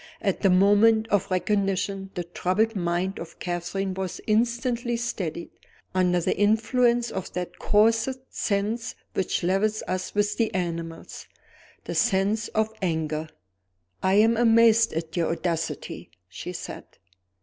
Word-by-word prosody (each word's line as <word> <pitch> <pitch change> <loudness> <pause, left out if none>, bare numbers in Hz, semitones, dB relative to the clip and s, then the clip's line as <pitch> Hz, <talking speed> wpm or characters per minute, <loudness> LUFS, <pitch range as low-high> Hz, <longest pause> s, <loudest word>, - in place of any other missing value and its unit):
At 195 - -1
the 195 - +4
moment 205 +4 +5
of 200 -2 +1
recognition 195 0 0
the 175 - -2
troubled 185 +6 0
mind 175 +1 -1
of 165 - -9
Catherine 180 +2 -3
was 190 -1 -4
instantly 235 +2 0
steadied, 185 -8 -4 0.4
under 180 -1 +2
the 170 - 0
influence 235 +3 +2
of 190 -1 -5
that 180 -1 -5
coarsest 225 +5 +2
sense 215 +4 -1 0.2
which 190 - -1
levels 205 +4 +1
us 185 +2 -3
with 205 0 +1
the 230 -2 +1
animals 170 -2 -4 0.6
the - - -5
sense 205 0 +1
of 220 0 -1
anger. 160 -3 -1 0.7
"I 190 +1 +2
am 225 +2 +5
amazed 230 -1 +5
at 165 0 -4
your 170 -2 +1
audacity," 170 -1 -3 0.2
she 95 - -7
said. 180 - -7
195 Hz, 130 wpm, -25 LUFS, 180-225 Hz, 0.7 s, moment